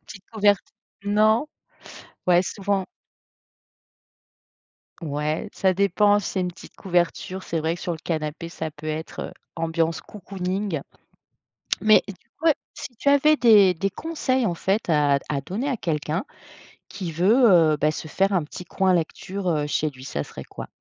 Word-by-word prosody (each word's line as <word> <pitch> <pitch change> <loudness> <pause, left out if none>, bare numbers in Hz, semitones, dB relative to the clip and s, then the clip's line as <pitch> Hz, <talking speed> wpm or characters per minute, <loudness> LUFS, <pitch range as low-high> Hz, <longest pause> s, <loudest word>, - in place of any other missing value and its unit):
Petite 195 - -11
couvert 205 -2 +4 0.5
non? 215 +6 +3 0.8
Ouais 175 -1 +5
souvent 195 0 -1 2.2
Ouais, 150 0 -2
ça 190 -1 +2
dépend, 200 +2 +3
si - - -5
c'est 190 - -2
une 180 - -1
petite 175 - -14
couverture, 185 0 -1
c'est 165 - -2
vrai 160 +2 -1
que 175 - -12
sur 175 - -2
le - - -6
canapé 160 0 -3
ça 160 -2 -5
peut 150 0 -13
être, 155 +1 -4
heu, - - -13 0.2
ambiance 165 -1 -1
cocooning. 190 -4 -4 1.0
Mais 215 0 +6
du 200 - -7 0.2
coup, 325 - -3
heu, 315 - +7 0.2
si 245 - -8
tu 280 - -1
avais 285 +2 +5
des 210 -8 +6
des 195 +4 -1
conseils 260 - -1
en 175 - 0
fait 195 +4 -1
à 145 -3 +3
d - - -20
à 140 -2 -1
donner 205 - -3
à 265 - 0
quelqu'un 160 0 -2 0.6
qui 180 -4 -5
veut, 180 +7 +3 0.4
heu, 150 - -1
bah, 150 +1 +2
se 155 +1 -5
faire 195 +6 +1
un 180 -4 +2
petit 160 +4 -9
coin 190 +2 +1
lecture, 180 +3 -2
heu, 150 -3 +1
chez 150 +1 0
lui, 130 -2 -13
ça 75 - -3
serait - - -9
quoi? - - -9
180 Hz, 170 wpm, -24 LUFS, 160-205 Hz, 2.2 s, heu